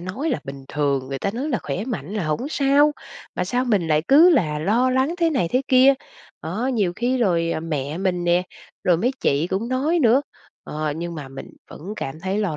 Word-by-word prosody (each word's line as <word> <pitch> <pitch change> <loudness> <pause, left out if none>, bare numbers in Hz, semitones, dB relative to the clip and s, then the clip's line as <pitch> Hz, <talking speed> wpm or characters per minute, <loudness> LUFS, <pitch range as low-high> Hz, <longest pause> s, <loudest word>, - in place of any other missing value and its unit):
nói 210 - -3
là 250 - -1
bình 135 0 -8
thường, 140 -3 -1
người 135 0 -4
ta 200 - -1
nói 260 +8 -4
là 245 - 0
khỏe 200 - -3
mạnh 200 - -5
là 200 -6 -2
hổng 195 - -2
sao, 290 0 +3 0.4
mà - - -1
sao 245 +7 0
mình 200 -9 +1
lại 155 0 +2
cứ 320 +6 +7
là 155 - +2
lo 230 +10 +2
lắng 265 +6 +1
thế 335 -1 +2
này 245 - 0
thế 255 +2 +1
kia 260 +1 +6
đó. 275 - +6 0.5
Đó, 205 +10 -3
nhiều 210 -9 0
khi 250 +2 0
rồi 170 -6 +1
mẹ 150 0 -3
mình 180 -2 -1
nè, 175 +1 +3 0.4
rồi 175 -2 +4
mấy 240 +9 +1
chị 145 +4 +1
cũng 195 +6 -2
nói 290 +7 +1
nữa, 250 -1 +4 0.4
ờ, 155 -1 -3
nhưng 170 0 -5
mà 145 -4 -7
mình 135 0 -9 0.2
vẫn 190 +7 -8
cảm 135 +4 -5
thấy 190 +3 -2
lo 190 -8 -1
195 Hz, 225 wpm, -22 LUFS, 160-255 Hz, 0.5 s, cứ